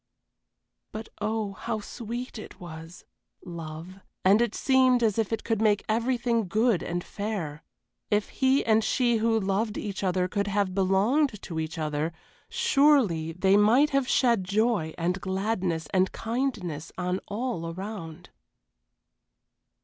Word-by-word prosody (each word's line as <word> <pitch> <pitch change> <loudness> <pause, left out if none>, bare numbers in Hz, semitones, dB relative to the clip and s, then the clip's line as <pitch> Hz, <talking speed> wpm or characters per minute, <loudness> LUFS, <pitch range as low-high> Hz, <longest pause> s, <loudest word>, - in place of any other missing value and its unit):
But 220 +1 -7
oh, 215 -1 -1
how 225 +2 -3
sweet 235 +3 -6
it 215 - -11
was! 165 -1 -10 0.4
love 170 +1 -8 0.3
and 200 +4 +6
it 235 -3 0
seemed 260 -2 +3
as 220 -1 +2
if 220 -1 0
it 225 - -2
could 225 -2 -1
make 210 -2 +2
everything 235 -1 +1
good 215 0 +2
and 175 0 -3
fair. 195 -9 -4 0.5
If 210 0 +1
he 265 +1 +2
and 220 -1 +3
she 240 -1 +2
who 225 0 +2
loved 205 +2 -1
each 200 -1 -4
other 185 -1 +1
could 200 +2 -1
have 200 -2 0
belonged 205 +7 +2
to 165 -3 -4
each 160 +1 -4
other, 155 +1 -2 0.4
surely 275 - +3
they 190 +3 +3
might 235 +9 +5
have 275 -2 +1
shed 235 -6 +3
joy 200 -3 +1
and 180 +3 -1
gladness 190 -4 -1
and 185 0 +3
kindness 225 - -3
on 180 +1 -1
all 205 -6 -3
around. 180 -3 -7
205 Hz, 140 wpm, -27 LUFS, 180-230 Hz, 0.5 s, and